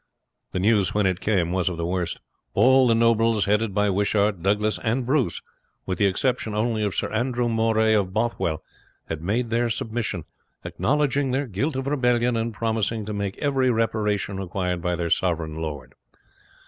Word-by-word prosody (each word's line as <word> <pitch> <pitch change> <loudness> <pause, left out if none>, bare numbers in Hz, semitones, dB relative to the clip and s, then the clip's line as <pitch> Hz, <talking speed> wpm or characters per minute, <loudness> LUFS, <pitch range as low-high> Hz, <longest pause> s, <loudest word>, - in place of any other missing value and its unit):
The - - -3
news 100 0 +2
when 105 -1 +2
it 95 -1 0
came 90 -5 +1
was 95 -1 +1
of 90 - -5
the 85 - -2
worst. 90 -1 -2 0.3
All 130 0 +5
the 115 - +4
nobles, 115 -2 +3
headed 105 +1 +1
by 105 -1 +2
Wishart, 100 -1 +1
Douglas, 105 +3 +1
and 120 +2 -1
Bruce, 130 - 0 0.4
with 95 - -3
the 100 - +4
exception 115 +2 -1
only 110 0 0
of 100 -3 -1
Sir - - -1
Andrew 120 +1 0
Moray 110 -1 +2
of 100 -3 +1
Bothwell, 105 -7 -1 0.5
had 80 -1 -4
made 115 +7 -1
their 120 +1 +1
submission, 110 -6 -3 0.4
acknowledging 140 0 0
their 135 +3 0
guilt 130 +7 -2
of 135 0 -2
rebellion, 125 -4 +1
and 115 +1 -1
promising 110 -1 -1
to 105 - -4
make 100 -1 -3
every 135 -3 +1
reparation 105 -4 0
required 90 -2 -2
by 90 +1 0
their 85 -1 -3
sovereign 85 -4 0
lord. 75 -5 -6
110 Hz, 175 wpm, -24 LUFS, 95-120 Hz, 0.5 s, All